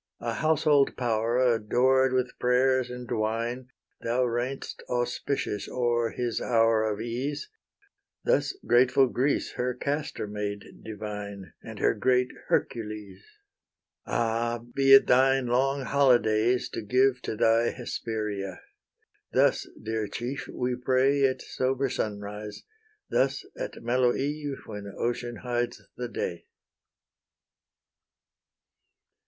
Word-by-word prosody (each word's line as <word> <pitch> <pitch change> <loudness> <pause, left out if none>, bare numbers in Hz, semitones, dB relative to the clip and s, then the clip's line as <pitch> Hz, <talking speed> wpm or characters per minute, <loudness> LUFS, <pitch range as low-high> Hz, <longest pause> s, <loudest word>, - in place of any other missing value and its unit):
A 115 -1 -2
household 150 -2 +3
power, 115 -1 0
adored 125 +2 +3
with 130 -1 -1
prayers 125 0 +2
and 125 0 -7
wine, 115 +3 -1 0.3
Thou 120 +2 +1
reign'st 125 +3 -3
auspicious 120 -3 -2
o'er 120 -2 +1
his 120 -2 -2
hour 115 -2 +3
of 105 - -4
ease: 130 - -4 0.7
Thus 485 -5 +1
grateful 130 +2 +5
Greece 130 +3 0
her 125 0 -1
Castor 145 -1 -3
made 105 -1 -4 0.2
divine, 105 -2 -7
And - - -9
her - - +3
great 125 +4 +2 0.2
Hercules. 105 -4 -2 0.8
Ah! 115 0 0
be 135 0 +3
it 135 - +7
thine 135 +1 +4
long 135 +3 +1
holydays 120 -4 +3
to - - -5
give 125 +4 +2
To 110 - -4
thy 115 +1 +3
Hesperia! 105 -5 -4 0.7
thus, - - +3
dear 110 -1 -2
chief, 125 +6 -5
we 125 0 -2
pray 130 +3 +2
At 130 -1 0
sober 130 +1 -1
sunrise; 105 -1 -5 0.5
thus - - +1
at - - -6
mellow 120 +1 +2
eve, 145 0 -3
When 105 -2 -7
ocean 120 0 -2
hides 120 0 -1 0.2
the 125 - -4
day. 85 -6 -4
120 Hz, 115 wpm, -27 LUFS, 110-130 Hz, 0.8 s, it